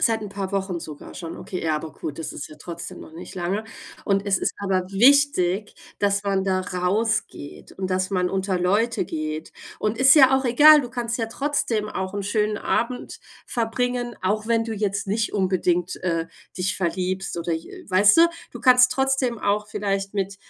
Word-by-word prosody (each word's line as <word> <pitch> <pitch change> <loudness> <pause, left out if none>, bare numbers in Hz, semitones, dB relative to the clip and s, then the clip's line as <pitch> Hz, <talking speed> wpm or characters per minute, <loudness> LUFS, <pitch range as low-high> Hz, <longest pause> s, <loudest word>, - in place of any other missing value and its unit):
Seit 225 -1 +2
'n 210 - -6
paar 195 -1 -4
Wochen 190 -3 -2
sogar 150 -2 -10
schon, 165 -2 -7
okay. 185 -2 -6
Ja, 155 -2 +1
aber 155 +1 -6
gut, 150 - -7
das 160 - -5
ist - - -7
ja 155 - -13
trotzdem 170 +2 -8
noch - - -12
nicht 170 +2 -10
lange. 185 +4 -2 0.4
Und 200 0 +1
es 195 - +2
ist - - -1
aber 190 -2 0
wichtig, 210 -4 +3 0.3
dass 200 0 +1
man 195 -1 +1
da 185 -1 +1
rausgeht 185 -2 -2
und 190 -1 -4
dass 185 +1 0
man 180 -2 +1
unter 190 -1 -1
Leute 205 +5 +1
geht. 155 -1 -5 0.3
Und 215 +2 -1
ist 265 0 +7
ja 265 -2 +7
auch 265 - -2
egal, 295 +5 +7
du 245 -2 -7
kannst 240 -1 -3
ja 225 - -1
trotzdem 230 -4 -1
auch 190 -1 -4
'n 200 -1 -3
schönen 210 0 0
Abend 245 +2 -2 0.3
verbringen, 240 +1 -2
auch 210 +3 0
wenn 230 -1 +2
du 225 -1 -4
jetzt 200 -1 -2
nicht 215 +3 -1
unbedingt, 180 -2 +1
äh, 165 -2 -1 0.3
dich 190 +2 -1
verliebst 185 0 -2
oder 170 0 -2
j 160 0 -5
äh, - - -12
weißte? 205 - +6 0.2
Du - - -9
kannst 250 -1 +6
trotzdem 265 -3 0
auch 210 +1 0
vielleicht 195 -1 -2
mit, 195 -1 -2
200 Hz, 190 wpm, -23 LUFS, 185-230 Hz, 0.4 s, ist